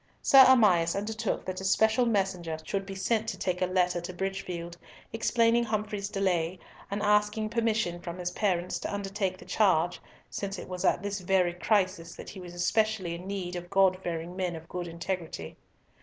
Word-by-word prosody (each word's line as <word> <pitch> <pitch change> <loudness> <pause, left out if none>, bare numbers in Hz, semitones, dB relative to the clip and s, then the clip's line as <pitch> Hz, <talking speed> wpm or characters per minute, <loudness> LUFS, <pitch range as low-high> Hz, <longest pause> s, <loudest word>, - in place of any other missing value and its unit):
Sir 270 -1 +9
Amias 190 -10 +5
undertook 220 +1 -2
that 185 0 -4
a - - -6
special 220 +5 +3
messenger 190 -7 0
should 195 +4 -3
be 195 - -6
sent 220 +3 0
to 190 - -3
take 185 -1 -2
a 185 - +2
letter 180 -1 +1
to 175 - -6
Bridgefield, 180 -2 -4 0.4
explaining 230 +1 +3
Humfrey's 210 -2 -2
delay, 185 -3 0 0.3
and 205 +1 -2
asking 210 +1 +2
permission 220 -6 0
from 170 0 -6
his 180 -1 -3
parents 180 -2 -1
to - - -4
undertake 195 -1 -2
the - - -13
charge, 180 -5 +2 0.3
since 195 -1 -4
it - - -8
was 180 -1 -5
at 175 - +2
this 200 0 -2
very 180 -1 +2
crisis 185 -3 0
that - - -9
he 195 - -10
was 175 -1 -9
especially 200 0 +1
in 175 +2 -7
need 185 -3 -4
of 175 0 -6
God 195 -1 +4
fearing 170 0 -4
men 180 -2 -2
of 160 0 -9
full 175 0 -5
integrity. 170 - -5
190 Hz, 185 wpm, -29 LUFS, 175-210 Hz, 0.4 s, Sir